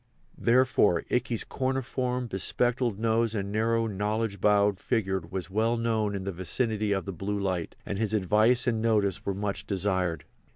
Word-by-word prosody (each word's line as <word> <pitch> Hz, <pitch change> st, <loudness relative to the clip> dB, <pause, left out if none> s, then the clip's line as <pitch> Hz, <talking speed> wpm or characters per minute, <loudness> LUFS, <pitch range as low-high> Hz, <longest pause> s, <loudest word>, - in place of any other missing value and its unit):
Therefore 120 Hz, -8 st, +3 dB
Ikey's 120 Hz, -2 st, 0 dB
corniform, 130 Hz, -1 st, -2 dB
be 95 Hz, -3 st, -4 dB
spectacled 120 Hz, 0 st, 0 dB
nose 115 Hz, 0 st, +1 dB
and 100 Hz, -1 st, -3 dB
narrow, 115 Hz, +2 st, +1 dB
knowledge 105 Hz, 0 st, -2 dB
bowed 100 Hz, -1 st, +3 dB
figure 95 Hz, -6 st, 0 dB
was 90 Hz, +1 st, -6 dB
well 115 Hz, +4 st, +1 dB
known 110 Hz, -3 st, 0 dB
in 95 Hz, -, -4 dB
the 100 Hz, -, -3 dB
vicinity 105 Hz, +4 st, -1 dB
of 95 Hz, -1 st, 0 dB
the 100 Hz, -, -4 dB
Blue 100 Hz, +4 st, -3 dB
Light, 95 Hz, -4 st, -2 dB
and 100 Hz, -, -3 dB
his 110 Hz, -1 st, 0 dB
advice 110 Hz, +5 st, +3 dB
and 115 Hz, -3 st, 0 dB
notice 105 Hz, -5 st, +1 dB
were 100 Hz, -, 0 dB
much 100 Hz, 0 st, -3 dB
desired. 95 Hz, -5 st, 0 dB
105 Hz, 165 wpm, -28 LUFS, 95-115 Hz, -, Therefore